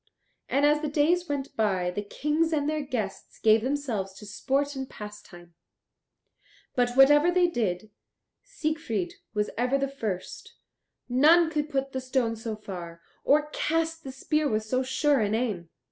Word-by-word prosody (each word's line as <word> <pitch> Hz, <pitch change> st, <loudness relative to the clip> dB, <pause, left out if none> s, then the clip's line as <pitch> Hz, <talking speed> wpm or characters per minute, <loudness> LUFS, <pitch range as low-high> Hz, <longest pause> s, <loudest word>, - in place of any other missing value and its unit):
And 280 Hz, +2 st, +3 dB
as 300 Hz, +1 st, +3 dB
the 305 Hz, -, -1 dB
days 320 Hz, +4 st, +1 dB
went 280 Hz, -1 st, -3 dB
by 190 Hz, -5 st, +1 dB
the 205 Hz, -, -3 dB
Kings 300 Hz, +10 st, -1 dB
and 295 Hz, -2 st, 0 dB
their 305 Hz, 0 st, 0 dB
guests 230 Hz, -8 st, -5 dB
gave 220 Hz, 0 st, +4 dB
themselves 245 Hz, -7 st, -2 dB
to 210 Hz, -, -11 dB
sport 275 Hz, +7 st, -1 dB
and 265 Hz, -1 st, -5 dB
pastime; 175 Hz, -5 st, -11 dB, 1.2 s
but 245 Hz, -1 st, +1 dB
whatever 295 Hz, +5 st, +6 dB
they 355 Hz, 0 st, +4 dB
did, 215 Hz, -, -2 dB, 0.5 s
Siegfried 310 Hz, -, -3 dB, 0.2 s
was 210 Hz, 0 st, 0 dB
ever 250 Hz, +3 st, +2 dB
the 275 Hz, 0 st, 0 dB
first; 215 Hz, -9 st, -5 dB, 0.5 s
none 315 Hz, +6 st, +5 dB
could 300 Hz, -1 st, -1 dB
put 275 Hz, -2 st, -1 dB
the 260 Hz, -, -3 dB
stone 255 Hz, -3 st, 0 dB
so 225 Hz, 0 st, -5 dB
far, 175 Hz, -5 st, -8 dB, 0.2 s
or 300 Hz, +1 st, +3 dB
cast 325 Hz, +1 st, -1 dB
the 265 Hz, -, -6 dB
spear 300 Hz, +3 st, 0 dB
with 215 Hz, -2 st, 0 dB
so 255 Hz, +4 st, 0 dB
sure 275 Hz, +2 st, +2 dB
an 210 Hz, 0 st, +1 dB
aim. 210 Hz, -8 st, -2 dB
265 Hz, 160 wpm, -27 LUFS, 215-300 Hz, 1.2 s, whatever